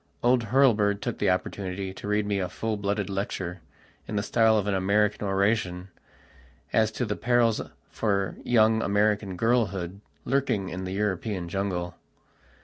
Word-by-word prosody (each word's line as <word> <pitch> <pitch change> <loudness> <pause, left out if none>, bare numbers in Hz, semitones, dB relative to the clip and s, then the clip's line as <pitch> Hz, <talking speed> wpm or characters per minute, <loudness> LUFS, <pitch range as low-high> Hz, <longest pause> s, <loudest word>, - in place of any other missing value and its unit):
Old 120 -1 +3
Hurlbird 110 -5 +3
took - - -4
the 100 - +2
opportunity 95 +1 -2
to 100 - -8
read 105 0 +1
me 100 -1 0
a 90 -2 -2
full 110 +4 -2
blooded 100 -1 -1
lecture, 95 -2 -4 0.5
in - - -4
the 100 - 0
style 110 0 +3
of 105 - 0
an 105 - 0
American 100 +2 +1
oration, 95 -2 0 0.8
as 110 -1 +3
to 125 - -1
the 105 -1 -2
perils 120 -2 +2 0.3
for 100 -3 0
young 110 -2 +4
American 105 -1 +1
girlhood 100 -5 0 0.2
lurking 125 -8 0
in 95 +1 -5
the 95 - -4
European 100 -2 -2
jungle. 90 -2 -2
100 Hz, 150 wpm, -27 LUFS, 95-110 Hz, 0.8 s, young